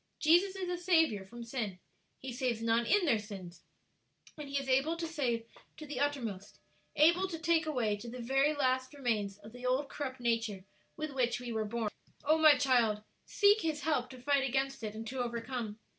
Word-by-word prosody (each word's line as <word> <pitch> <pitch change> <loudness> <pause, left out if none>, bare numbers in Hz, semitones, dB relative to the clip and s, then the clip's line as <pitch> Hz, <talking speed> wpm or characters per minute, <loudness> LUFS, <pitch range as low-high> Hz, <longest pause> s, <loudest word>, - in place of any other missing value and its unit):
Jesus 350 +5 +4
is 380 -1 -3
a 355 0 -3
Saviour 325 - +3
from 235 +5 -10
sin 230 -6 -4 0.4
(He 260 -1 -7
saves 245 -2 -1
none 230 +1 +2
in 405 -3 +4
their 235 -8 +3
sins), 185 -5 -9 0.7
and 300 -2 -8
He 280 - -1
is 275 -1 -3
able 270 +6 +2
to 335 - -3
save 255 -8 -1 0.3
to 310 - -8
the 290 -3 -5
uttermost, 235 -9 -2 0.4
able 340 +5 +5
to 340 -3 -5
take 325 0 +2
away 240 -8 0
the 235 +4 -8
very 270 +5 +2
last 260 -1 0
remains 215 -7 -1
of 210 +1 -13
the 245 0 -11
old 270 +3 +1
corrupt 265 -3 -5
nature 230 -5 -1 0.3
with 310 -1 -3
which 245 -3 0
we 245 -1 -5
were 220 -1 -1
born. 220 0 -2 0.3
"Oh, 310 +2 +4
my 310 -3 +7
child, 240 -6 +2 0.2
seek 410 +1 +4
His 310 -2 -1
help 265 -4 0
to 255 - -11
fight 280 +2 +2
against 270 +1 -1
it 215 -1 -5
and 225 +1 -6
to 260 +3 -5
overcome! 235 -2 -4
255 Hz, 195 wpm, -32 LUFS, 230-300 Hz, 0.7 s, my